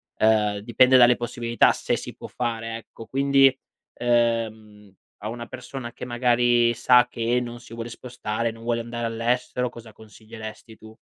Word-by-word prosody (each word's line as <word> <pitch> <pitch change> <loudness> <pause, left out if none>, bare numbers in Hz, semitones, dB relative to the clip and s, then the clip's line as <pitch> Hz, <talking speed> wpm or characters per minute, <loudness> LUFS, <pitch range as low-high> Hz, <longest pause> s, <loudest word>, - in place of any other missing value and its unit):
ehm, 105 -2 +2
dipende 125 +4 +4
dalle 120 -1 +7
possibilità 120 0 +1
se - - -1
si - - -8
può - - -9
fare, 115 -2 -3
ecco. 115 0 -13
Quindi, 135 +1 +4 0.4
ehm, 115 -3 -1 0.3
a 105 - -7
una 115 +1 -6
persona 130 -4 -8
che - - -8
magari 120 -1 +2
sa 125 0 +5
che 120 +1 0
non 120 -1 -7
si 120 -1 -14
vuole 115 0 -6
spostare, 115 -2 -4
non 115 0 -13
vuole 115 0 0
andare 120 0 -4
all'estero, 120 +2 -1
cosa 115 -2 -11
consiglieresti 110 +1 -11
tu? 110 0 -15
120 Hz, 155 wpm, -24 LUFS, 115-120 Hz, 0.4 s, dalle